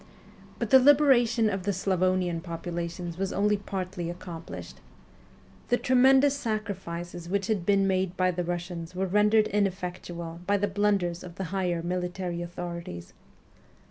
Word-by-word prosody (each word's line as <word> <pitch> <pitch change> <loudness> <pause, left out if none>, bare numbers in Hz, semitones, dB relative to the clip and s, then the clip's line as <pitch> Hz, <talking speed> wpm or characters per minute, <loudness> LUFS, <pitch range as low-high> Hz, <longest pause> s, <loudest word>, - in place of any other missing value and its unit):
But - - -3
the 265 - +9
liberation 255 -5 +5
of 195 -2 -1
the 200 +2 0
Slavonian 185 -2 0
populations 170 0 -5
was 195 0 -1
only 210 +1 +2
partly 185 -3 -4
accomplished. 175 -1 -8 0.9
The 245 - +3
tremendous 265 +3 +5
sacrifices 190 -8 -4
which 200 0 0
had 200 -5 -1
been 200 -1 +4
made 190 -1 0
by 185 0 +3
the 180 0 -2
Eussians 175 0 -5
were 190 +1 0
rendered 210 +3 +4
ineffectual 180 -4 -3
by 205 0 +3
the 205 +1 0
blunders 195 -4 0
of 175 -2 -10
the 190 - -4
higher 180 -3 0
mili 180 0 -2
tary 175 -2 -4
authorities. 170 - -6
185 Hz, 140 wpm, -27 LUFS, 175-205 Hz, 0.9 s, the